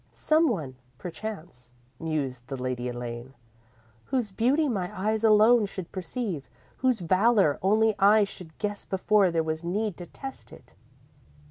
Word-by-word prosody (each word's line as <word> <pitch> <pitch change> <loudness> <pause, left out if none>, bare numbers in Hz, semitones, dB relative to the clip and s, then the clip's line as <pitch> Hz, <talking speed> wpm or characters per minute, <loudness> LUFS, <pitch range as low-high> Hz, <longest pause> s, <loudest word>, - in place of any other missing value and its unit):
_ - - -37
_"Some 315 0 +3
one, 150 - -3 0.2
perchance," 170 - -7 0.3
mused 135 -6 -3
the 135 - -5
Lady 125 -1 -3
Elaine, 120 +1 -6 0.7
"whose 245 -6 -1
beauty 260 +10 +2
my 190 -8 -1
eyes 215 +3 0
alone 220 +1 +6
should 190 -3 -7
perceive, 185 - -4 0.3
whose 255 -5 +1
valour 185 -2 +3
only 215 +3 +3
I 210 +2 +6
should 180 -5 -8
guess 205 -1 -3
before 195 0 +2
there 165 -1 0
was 160 +1 -3
need 200 +3 -2
to 175 - -8
test 270 +8 -9
it. - - -15
190 Hz, 145 wpm, -27 LUFS, 155-220 Hz, 0.7 s, alone